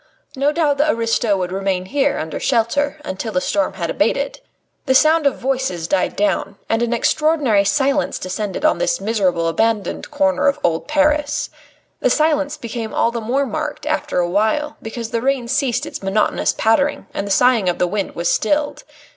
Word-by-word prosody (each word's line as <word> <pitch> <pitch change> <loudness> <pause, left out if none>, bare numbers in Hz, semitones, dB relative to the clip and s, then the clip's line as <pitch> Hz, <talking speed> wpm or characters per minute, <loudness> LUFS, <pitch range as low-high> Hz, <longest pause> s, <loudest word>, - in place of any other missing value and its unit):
No 280 +2 +2
doubt 300 -3 +1
the 300 +2 +3
aristo 230 -4 +1
would 180 -1 -3
remain 190 -1 -1
here 280 +6 0
under 160 - -4
shelter 275 +5 0
until 190 +4 -4
the 275 - +1
storm 295 +2 0
had - - -3
abated. - - 0
Soon - - -36 0.4
the 260 - +3
sound 310 +1 +5
of 275 - +1
voices 255 -11 -2
died 190 0 0
down, 200 -1 0
and 225 +1 0
an 240 0 0
extraordinary 265 -3 +2
silence 275 +7 +1
descended 200 +7 -4
on 310 - +3
this - - 0
miserable, 185 -7 0
abandoned 210 +3 -1
corner 290 -1 +1
of 280 - +2
old 165 -1 0
Paris. 295 0 +1 0.5
The - - +2
silence 300 -2 +1
became 230 -2 -5
all 230 - +2
the 235 -1 -4
more 260 +6 0
marked 300 +3 -4
after 305 -8 -1
a 175 -1 +2
while, 220 +11 0
because 225 0 -6
the 230 - -1
rain 265 -2 0
ceased 260 -2 0
its - - -7
monotonous 195 +2 +1
pattering 250 +6 +1
and 200 - -3
the - - -4
soughing 225 -1 +4
of 175 - -1
the - - +2
wind 200 +2 -3
was 170 0 -2
stilled. 290 +10 0
240 Hz, 185 wpm, -19 LUFS, 200-290 Hz, 0.5 s, sound